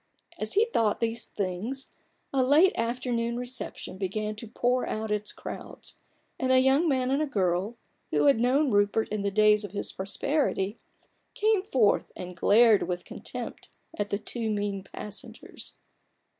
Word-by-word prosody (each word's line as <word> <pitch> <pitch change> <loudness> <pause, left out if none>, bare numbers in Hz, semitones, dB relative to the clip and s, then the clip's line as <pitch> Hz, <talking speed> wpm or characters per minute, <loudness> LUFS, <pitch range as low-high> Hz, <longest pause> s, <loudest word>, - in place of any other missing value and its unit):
As - - -1
he 420 +3 +4
thought 225 - +1
these 230 0 -2
things, 210 +8 -3 0.5
a 270 - +3
late 300 +9 +5
afternoon 235 0 -1
reception 245 -6 -4
began 210 +2 -2
to 230 - -7
pour 245 +3 0
out 220 0 -3
its 210 0 -1
crowds, - - -8 0.4
and 260 0 +1
a 260 - +6
young 270 +6 +4
man 260 -2 +1
and 275 +2 +2
a 305 - 0
girl, 195 -1 0 0.3
who - - +2
had 280 -5 +5
known 260 +4 +3
Rupert 205 +2 +2
in 210 0 -2
the 200 - 0
days 210 +1 +4
of 205 -2 -7
his 205 - -3
prosperity, 205 0 -1 0.6
came 430 -2 +3
forth 250 - +2
and 180 0 -7
glared 215 +4 +5
with 180 -1 -3
contempt - - -7 0.3
at 205 0 -2
the 200 - 0
two 225 +2 -3
mean 205 -2 -2
passengers. 205 +2 -8
225 Hz, 155 wpm, -28 LUFS, 205-260 Hz, 0.6 s, a